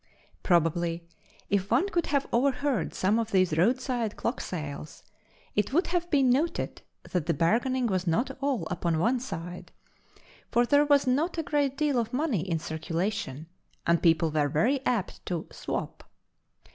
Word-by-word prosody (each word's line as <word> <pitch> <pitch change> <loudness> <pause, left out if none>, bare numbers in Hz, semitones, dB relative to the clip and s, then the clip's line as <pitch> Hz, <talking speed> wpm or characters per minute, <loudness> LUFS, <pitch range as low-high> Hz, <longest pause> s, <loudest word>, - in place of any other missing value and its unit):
Probably, 170 -1 +1 0.4
if 200 0 +1
one 385 - +3
could 345 -4 0
have 280 -2 +1
overheard 255 - +1
some 205 +5 +2
of 225 -1 -2
these 185 -6 +2
roadside 240 - +1
clock 235 - -2
sales 150 -3 -6 0.5
it 210 +5 0
would 345 +5 +3
have 350 0 -1
been 275 -5 +4
noted 300 +7 -1 0.3
that 175 -5 -1
the 165 - +1
bargaining 240 - +1
was 185 -4 -1
not 240 +11 0
all 270 - 0
upon 170 -2 0
one 235 +10 +2
side, 175 -8 -7 0.8
for 240 +1 +3
there 285 +4 +4
was 285 -1 +4
not 295 +8 +1
a 325 - 0
great 285 -3 0
deal 290 -4 +2
of 230 0 -3
money 260 - 0
in 170 -2 -1
circulation, 160 -1 -3 0.4
and 170 0 +3
people 165 -2 +3
were 150 -1 +1
very 250 - +1
apt 225 -6 -1
to 175 -3 -2
"swap." - - -5
220 Hz, 160 wpm, -28 LUFS, 170-270 Hz, 0.8 s, been